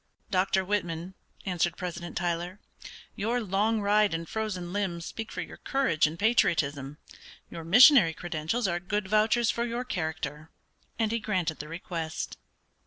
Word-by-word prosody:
"Dr. 190 0 +2
Whitman," 180 -3 -2 0.3
answered 175 -2 0
President 175 -1 -5
Tyler, 175 +2 -2 0.6
"your 230 +4 0
long 215 +1 +1
ride 205 -2 +3
and 165 0 -5
frozen 185 -5 -4
limbs 180 -5 -2
speak 225 -1 -6
for - - -4
your - - -8
courage 260 - +1
and 155 +2 -6
patriotism; 150 - +1 0.5
your 165 - -7
missionary 205 - +7
credentials 175 +7 -2
are 175 -1 -1
good 195 +3 -2
vouchers 220 +3 +3
for 235 - -2
your 240 +1 -2
character;" 160 - -4 0.5
and 220 -1 +1
he 230 - 0
granted 185 -7 -1
the 150 - -6
request. 165 -1 -5
185 Hz, 145 wpm, -28 LUFS, 165-215 Hz, 0.6 s, missionary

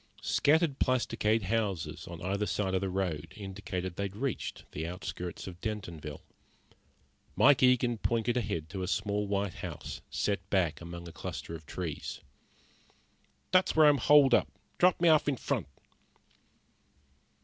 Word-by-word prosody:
Scattered 150 -1 +3
plasticade 115 -4 +1
houses 95 -7 -2
on 85 -1 -8
either 100 +3 -1
side 95 -2 -1
of 95 - +1
the 95 - -1
road 90 -5 -2
indicated 95 -3 -5
they 100 - -1
had 100 0 -6
reached 130 +2 -3
the 80 +2 -4
outskirts 90 -1 -5
of 90 -2 -9
Dentonville. 85 -9 -5 1.1
Mike 145 0 +6
Eagen 125 -2 +4
pointed 115 +1 0
ahead 100 -10 -2
to 95 +1 -5
a 90 - -2
small 105 +1 -1
white 100 -2 -1
house - - -6
set 100 -1 -1
back 85 -6 +1
among 85 0 -8
a - - -8
cluster 85 - -6
of 80 -3 -9
trees. 85 -5 -5 1.3
"There's 185 0 +4
where 155 -1 +7
I'm 145 -2 +5
holed 140 0 +6
up. - - +4 0.3
Drop 180 -1 +5
me 170 - +3
off 155 -2 +5
in 140 -3 +1
front." - - -2
100 Hz, 150 wpm, -31 LUFS, 90-120 Hz, 1.3 s, where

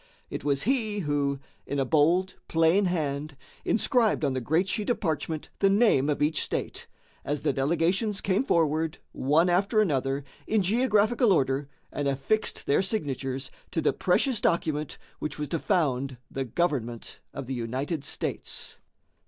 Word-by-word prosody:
It - - -4
was 140 -1 +1
he 220 -4 0
who, 145 -3 0 0.3
in 140 - -2
a 135 - +1
bold, 170 +6 +3
plain 165 +5 +3
hand, 150 -4 -2 0.3
inscribed 225 - +2
on 135 - +1
the 130 - -2
great 160 +10 +1
sheet 210 +2 -2
of 240 - +1
parchment 160 -3 -2
the 195 - +4
name 195 - +4
of 145 0 +1
each 150 0 +1
state, - - -3 0.4
as 145 0 -2
the - - +2
delegations 170 - +1
came 195 +5 +1
forward, 160 - +1
one 155 +6 +2
after 195 +5 +2
another, 140 -7 +1 0.2
in 215 -2 +2
geographical 220 +2 +3
order 135 -4 +1 0.2
and 145 -1 -2
affixed 140 +11 0
their 140 - +3
signatures 135 - -2 0.2
to - - -2
the - - +2
precious 260 -6 +1
document 155 -3 0 0.2
which 150 -1 -4
was 150 -1 -4
to 165 - -1
found 140 -9 0
the 135 0 -2
government 120 -5 -2
of 140 - -6
the 135 - -4
United 130 +6 -3
States. - - -4
155 Hz, 155 wpm, -27 LUFS, 140-195 Hz, 0.4 s, the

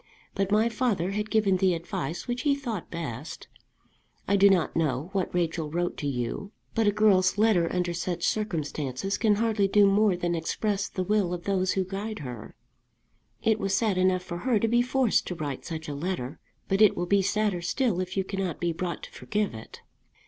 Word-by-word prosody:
But 195 0 -1
my 215 +2 +4
father 215 -6 0
had 210 +1 -2
given 210 -4 +3
the 185 -1 +2
advice 170 +2 -4
which 245 +1 -2
he 285 0 +2
thought 235 - -5
best. 150 -4 -6 0.8
I 200 - +3
do 200 0 +6
not 185 -4 +2
know 150 -1 0
what 190 -2 -1
Rachel 165 -3 -1
wrote 175 +3 -1
to 145 - -3
you, 130 - -3 0.2
but 225 -2 +2
a - - +5
girl's 200 -3 +3
letter 205 -6 +3
under 180 -1 -1
such 175 0 -3
circumstances 160 - -2
can 215 -2 +3
hardly 215 -2 +1
do 205 +1 +5
more 200 -1 +3
than 175 -1 -1
express 195 +5 -1
the 185 - -2
will 190 -2 +1
of 175 - -9
those 190 -1 +1
who 190 - +1
guide 200 +4 -5
her. 125 -6 -8 0.9
It 220 -1 +2
was 195 0 +1
sad 210 -5 +1
enough 185 0 +2
for 175 -1 -6
her 245 +2 +2
to 225 - +1
be 240 +2 +3
forced 250 -2 +1
to 180 - -3
write 145 -5 -5
such 160 -2 -5
a 145 - -4
letter, 150 -3 -4 0.3
but 195 +1 +1
it 215 - +6
will 175 - 0
be 200 +2 +3
sadder 200 -2 0
still 210 +2 0
if 185 +1 -4
you 190 - +2
cannot 190 -4 -3
be 170 -1 0
brought 175 +1 -4
to - - -9
forgive 210 - -2
it." 110 0 -10
190 Hz, 200 wpm, -27 LUFS, 170-210 Hz, 0.9 s, do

